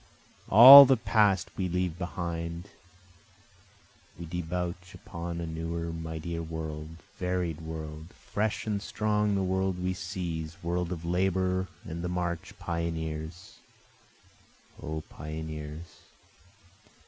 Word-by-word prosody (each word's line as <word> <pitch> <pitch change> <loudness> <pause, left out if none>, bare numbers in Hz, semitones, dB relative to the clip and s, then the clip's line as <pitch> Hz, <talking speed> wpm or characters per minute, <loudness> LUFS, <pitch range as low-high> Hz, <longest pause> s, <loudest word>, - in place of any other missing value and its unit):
All 135 +7 +12
the 135 -1 +3
past 100 -6 +2
we 95 -1 -2
leave 90 -1 -2
behind, 85 0 -5 1.5
We 85 - -7
debouch 90 +2 -5
upon 85 0 -6
a 85 - -3
newer 85 +1 -4
mightier 80 +1 -5
world, 80 -1 -6 0.2
varied 90 -3 -2
world, 80 -1 -7
Fresh 105 +1 -3
and 105 -2 -2
strong 105 0 0
the 95 - 0
world 95 0 0
we 90 +1 -2
seize, 85 -2 -5
world 85 +1 -2
of 85 -2 -5
labor 95 +1 0 0.2
and 85 +1 -6
the 90 - -2
march, 85 -2 -3
Pioneers! 80 0 -5 1.2
O 80 +1 -4
pioneers! 80 +1 -8
85 Hz, 110 wpm, -28 LUFS, 80-90 Hz, 1.5 s, All